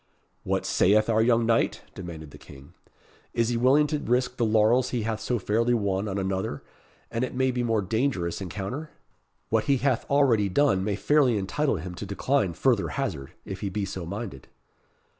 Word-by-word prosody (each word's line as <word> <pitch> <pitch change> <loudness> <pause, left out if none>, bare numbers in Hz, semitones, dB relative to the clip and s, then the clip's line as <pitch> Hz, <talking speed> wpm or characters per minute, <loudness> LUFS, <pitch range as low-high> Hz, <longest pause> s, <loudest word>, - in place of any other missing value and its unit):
"What - - -1
saith 110 +4 +3
our 110 0 +3
young 115 0 +3
knight?" 115 0 +1
demanded 80 -5 -8
the - - -13
King. 70 -1 -14 0.6
"Is 115 0 +2
he 120 - 0
willing 135 +5 +4
to 150 0 -2
risk 125 -1 0
the 120 - +1
laurels 110 +4 +3
he 120 -3 -2
hath 110 0 -2
so 125 - -1
fairly 115 +4 +1
won 100 -2 -1
on 100 -1 -3
another, 95 -6 -2 0.5
and 115 +1 -1
it 130 - -4
may 130 0 +2
be 125 0 -2
more 115 -3 +1
dangerous 100 -5 -1
encounter? 100 - -5 0.6
What 110 -1 +1
he 140 +2 +3
hath 130 -2 0
already 125 -8 +3
done 95 -3 +2
may 105 0 -1
fairly 130 0 +3
entitle 135 +9 0
him 90 +1 -6
to 95 - -7
decline 100 -1 0
further 115 +4 +1
hazard, 90 - -4
if 95 - -6
he 100 - -3
be 100 +1 -2
so 95 -1 -5
minded." 100 - -6
110 Hz, 185 wpm, -26 LUFS, 95-125 Hz, 0.6 s, willing